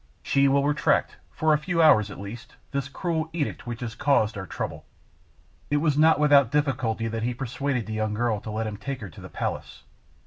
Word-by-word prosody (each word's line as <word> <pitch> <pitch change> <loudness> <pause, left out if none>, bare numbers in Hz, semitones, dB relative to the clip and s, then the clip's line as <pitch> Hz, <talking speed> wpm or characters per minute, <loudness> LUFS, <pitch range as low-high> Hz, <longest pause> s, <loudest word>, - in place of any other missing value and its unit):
She 140 0 +3
will 140 +1 +3
retract, 150 - +1
for 155 0 +1
a 150 - +2
few 175 +2 -2
hours 110 -10 +6
at 100 - -9
least, 115 +5 -9 0.2
this 140 -1 -2
cruel 160 +1 -2
edict 150 -6 -3
which 120 -1 -5
has 115 -2 -4
caused 115 -6 +2
our 95 -1 -6
trouble." - - -5 0.9
It 145 - +2
was 150 -1 +2
not 155 0 +5
without 145 -4 +5
difficulty 130 -6 0
that 115 0 -3
he 120 +2 -1
persuaded 135 -1 -2
the 110 - -5
young 110 -1 -1
girl 115 -2 0
to - - -7
let 110 +1 -2
him 105 -1 -4
take 135 +3 -5
her 100 - -6
to - - -13
the - - -9
palace. - - -5
130 Hz, 210 wpm, -26 LUFS, 110-145 Hz, 0.9 s, hours